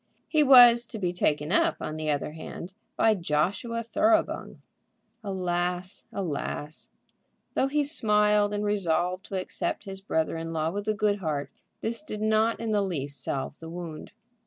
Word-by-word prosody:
He 310 - +3
was 245 -4 +8
to 230 - -6
be 180 -4 -1
taken 150 -3 0
up, 330 - +3
on 155 - -4
the 155 -1 -3
other 145 0 -1
hand, 170 +3 -8 0.2
by 225 - +4
Joshua 195 +7 -1
Thoroughbung. 320 +8 +1 0.6
Alas! 180 -2 -2
alas! 155 -4 -4 0.6
though 265 - +2
he 295 +2 +1
smiled 210 -7 +3
and 205 0 -2
resolved 180 -2 0
to 195 - -3
accept 185 - -3
his 195 -1 -7
brother 160 -6 -1
in 165 0 -5
law 160 0 0
with 205 +3 -4
a 215 - +1
good 205 0 +1
heart, 150 -5 -3 0.3
this 230 +3 -2
did 215 -9 -6
not 220 +1 +2
in 230 -1 -2
the 210 -1 +2
least 145 -8 -3
salve 135 +2 -3
the 165 - -9
wound. 170 -2 -7
195 Hz, 160 wpm, -27 LUFS, 165-220 Hz, 0.6 s, was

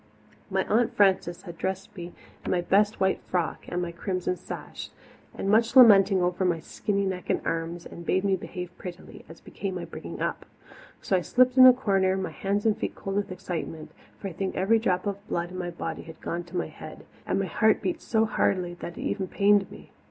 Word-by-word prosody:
My 190 -1 0
Aunt 230 +2 +1
Frances 190 -3 +2
had 170 -3 -10
dressed 190 +1 -4
me 175 -2 -7 0.3
in - - -4
my 180 - +1
best 205 +4 +2
white 190 0 +1
frock 175 -3 -1
and 180 0 -2
my 170 - -4
crimson 180 +1 -2
sash, - - -8 0.5
with - - -4
much 225 +4 +3
lamenting 195 -6 +7
over 180 +1 0
my 175 -3 +1
skinny 200 +5 -2
neck 185 -1 -4
and - - +2
arms, 165 +1 -3
and 170 - -9
bade 185 +3 +1
me 195 -1 +2
behave 180 -1 -7
prettily, 180 -1 -9
as 165 - -13
became 195 -2 -5
my 175 - -4
bringing - - -8
up. - - -2 0.6
So 195 - +1
I 180 - +2
slipped 255 +6 +3
in 255 -1 +10
a - - +11
corner, 195 -6 +1
my 190 - -3
hands 200 +2 -2
and 220 -2 +3
feet 220 - -4
cold 195 0 -5
with 205 -2 -1
excitement, 165 -3 -5 0.3
for 200 - -6
I 185 - -6
think 190 +2 -3
every 215 +5 +3
drop 185 -3 0
of 200 +1 -4
blood 175 +1 -2
in 185 - -7
my 175 -1 -3
body 170 - -5
had 160 -1 -12
gone 175 0 -4
to 175 +1 -6
my 175 - 0
head, - - -11 0.2
and - - +1
my - - 0
heart - - +3
beat 335 -2 -2
so 220 -1 +2
hardly 180 -4 0
that 170 - -7
it - - -6
even 190 -2 -2
pained 200 0 +3
me. - - -13
190 Hz, 220 wpm, -27 LUFS, 175-200 Hz, 0.6 s, a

